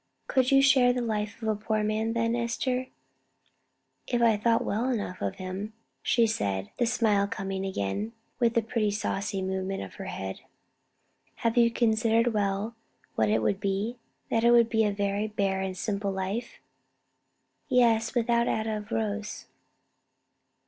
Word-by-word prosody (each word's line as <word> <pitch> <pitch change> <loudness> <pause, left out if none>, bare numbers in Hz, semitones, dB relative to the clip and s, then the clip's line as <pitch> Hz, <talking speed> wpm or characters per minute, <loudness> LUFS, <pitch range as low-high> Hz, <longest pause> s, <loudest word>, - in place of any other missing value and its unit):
"Could 260 -2 +2
you 275 0 +5
share 260 -3 +5
the 250 - -1
life 210 -2 -2
of - - -2
a 215 - +2
poor 215 +1 -1
man, 215 +1 0
then, 230 0 +1
Esther?" 250 +2 -1 1.2
"If 245 - 0
I 230 -2 +5
thought 230 +2 +2
well 230 +6 0
enough 205 -7 -3
of 100 -1 -2
him," 190 +3 -5 0.3
she 235 -2 +3
said, 100 - -1
the 240 - +2
smile 215 -4 +2
coming 195 -1 -4
again, 190 - -3 0.3
with 235 -2 +2
the 230 - +3
pretty 220 -1 0
saucy 200 -1 -2
movement 190 - -2
of 95 - -9
her - - -5
head. 95 0 -5 1.0
"Have 230 0 +2
you 235 -1 +5
considered 230 0 +2
well 205 +1 -1 0.4
what 110 -1 +2
it 110 +1 +2
would 195 - +1
be? 200 +5 -2 0.3
that 225 - +2
it 235 - +6
would 235 -1 +6
be 225 -1 +2
a 205 - +2
very 200 +1 -1
bare 195 -2 -1
and 190 -1 -3
simple 200 0 -2
life?" 195 +5 -3 1.1
"Yes 230 -2 +3
without 235 0 +2
atta 220 0 -1
of 210 0 -8
rose." 210 -1 -3
215 Hz, 160 wpm, -28 LUFS, 195-235 Hz, 1.2 s, it